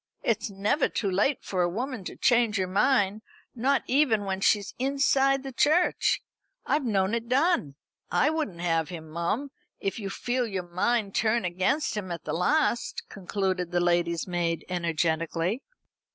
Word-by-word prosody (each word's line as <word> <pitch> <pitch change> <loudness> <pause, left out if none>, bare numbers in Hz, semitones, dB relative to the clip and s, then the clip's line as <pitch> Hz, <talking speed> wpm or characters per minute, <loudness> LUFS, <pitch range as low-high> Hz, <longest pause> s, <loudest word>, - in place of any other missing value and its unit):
It's - - 0
never 205 +9 +1
too 200 -3 -1
late 210 +9 +1
for 185 -2 -1
a 175 - +2
woman 245 +3 -4
to - - -6
change 235 -4 +3
her 190 - +1
mind, 205 +1 +2 0.3
not 265 +3 +1
even 250 -7 +2
when 190 0 -2
she's 200 0 +2
inside 275 0 +2
the 270 - -6
church. 310 +8 +2 0.4
I've 295 - +1
known 200 -4 +1
it 235 0 -2
done. 265 - +2 0.3
I 300 - +3
wouldn't 260 - -3
have 165 -2 0
him, 165 -3 -8
mum, 205 - -2 0.3
if 195 +3 -2
you 200 -2 -4
feel 245 +4 -1
your 190 -4 -4
mind 200 +3 0
turn 225 0 +1
against 190 - 0
him 195 -4 -4
at 170 - -5
the 150 - -4
last," 240 - +1
concluded 185 -2 -2
the 175 0 +1
lady's 175 -1 +1
maid 170 -2 -1
energetically. 165 - -1
200 Hz, 160 wpm, -27 LUFS, 175-255 Hz, 0.4 s, change